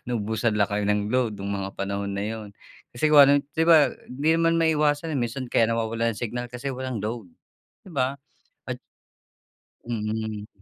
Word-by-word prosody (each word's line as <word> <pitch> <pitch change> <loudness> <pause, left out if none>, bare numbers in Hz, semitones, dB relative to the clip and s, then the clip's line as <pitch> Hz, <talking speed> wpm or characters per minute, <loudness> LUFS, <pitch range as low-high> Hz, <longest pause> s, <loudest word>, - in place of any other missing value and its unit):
naubusan 110 -1 0
lang 105 - +4
kayo 105 0 0
ng 105 +1 0
load 125 -4 +1
nung 100 +1 -3
mga 100 -1 -3
panahon 100 0 -2
na 100 - -2
yun? 110 -1 -6 0.4
Kasi, 140 +6 +1
kung 150 - +9
ano, 140 0 +6 0.2
di 160 - +2
ba, 155 -4 +6 0.2
hindi 140 +5 -2
man 165 0 +3
maiwasan. 155 -1 +2
Minsan 125 +2 -3
kaya 115 - +4
nawawalan 115 0 0
ng - - -9
signal 120 +1 -3
kasi 125 +3 -5
walang 130 -3 -4
load, 110 -3 -4 0.6
di 190 - -12
ba? 135 -1 0 0.5
At. - - -4 1.1
Mm. 110 -2 -3
115 Hz, 170 wpm, -25 LUFS, 105-135 Hz, 1.1 s, kung